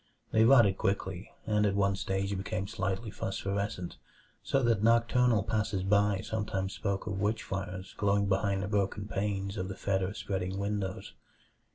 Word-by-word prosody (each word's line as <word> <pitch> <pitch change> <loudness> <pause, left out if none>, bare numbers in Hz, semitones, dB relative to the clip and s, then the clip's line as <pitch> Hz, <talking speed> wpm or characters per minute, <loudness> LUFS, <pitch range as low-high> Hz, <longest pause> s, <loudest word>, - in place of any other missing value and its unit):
They 110 0 +5
rotted 115 -7 +6
quickly, 95 -1 -1 0.2
and 105 -1 +2
at 100 -2 +2
one 100 -1 +2
stage 95 +1 -1
became 95 +1 -3
slightly 95 +4 -2
phosphorescent; 100 -1 -3 0.4
so 135 - +1
that 115 -4 +3
nocturnal 115 0 +4
passers 105 -3 -1
by 100 0 +3
sometimes 100 -3 -2
spoke 100 -2 -2
of 95 -1 -3
witch 105 +2 0
fires 95 -1 -5
glowing 100 0 +2
behind 100 0 +1
the - - -2
broken 100 0 -1
panes 100 0 -2
of 95 -1 -2
the 95 - -5
fetor 95 0 -1
spreading 95 -2 -3
windows. 100 -1 -3
100 Hz, 155 wpm, -31 LUFS, 95-105 Hz, 0.4 s, rotted